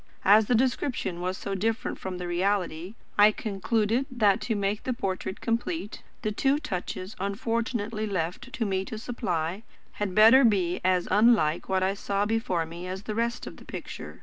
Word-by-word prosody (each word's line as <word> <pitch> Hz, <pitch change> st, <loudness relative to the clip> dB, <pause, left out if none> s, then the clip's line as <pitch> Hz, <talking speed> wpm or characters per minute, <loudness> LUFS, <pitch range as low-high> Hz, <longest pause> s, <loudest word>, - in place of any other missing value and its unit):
As 210 Hz, +2 st, +6 dB
the 245 Hz, -, +3 dB
description 240 Hz, -7 st, 0 dB
was 185 Hz, +1 st, -2 dB
so 200 Hz, -, -4 dB
different 225 Hz, +5 st, -1 dB
from 185 Hz, -1 st, -5 dB
the 180 Hz, 0 st, -5 dB
reality, 180 Hz, 0 st, -1 dB, 0.2 s
I 210 Hz, +1 st, +8 dB
concluded 220 Hz, +4 st, 0 dB
that, 215 Hz, -4 st, +2 dB
to 225 Hz, -, -1 dB
make 200 Hz, +1 st, -1 dB
the 255 Hz, -, -2 dB
portrait 190 Hz, -4 st, -3 dB
complete, 230 Hz, -, -2 dB, 0.2 s
the 215 Hz, -, 0 dB
two 270 Hz, +6 st, +2 dB
touches 190 Hz, -, -5 dB
unfortunately 220 Hz, +2 st, -2 dB
left 195 Hz, +7 st, -3 dB
to 230 Hz, -, -2 dB
me 190 Hz, -2 st, 0 dB
to 220 Hz, -, -6 dB
supply, 190 Hz, -6 st, -2 dB, 0.3 s
had 200 Hz, -3 st, -3 dB
better 225 Hz, +5 st, +8 dB
be 190 Hz, -6 st, +2 dB
as 185 Hz, -1 st, +2 dB
unlike 205 Hz, -7 st, +3 dB
what 190 Hz, -1 st, +2 dB
I 190 Hz, +1 st, +2 dB
saw 200 Hz, 0 st, -1 dB
before 210 Hz, -6 st, 0 dB
me 170 Hz, +2 st, -8 dB
as 190 Hz, +2 st, -5 dB
the 215 Hz, -, -4 dB
rest 235 Hz, +2 st, -1 dB
of -, -, -9 dB
the -, -, -14 dB
picture. -, -, -8 dB
205 Hz, 175 wpm, -27 LUFS, 185-230 Hz, 0.3 s, I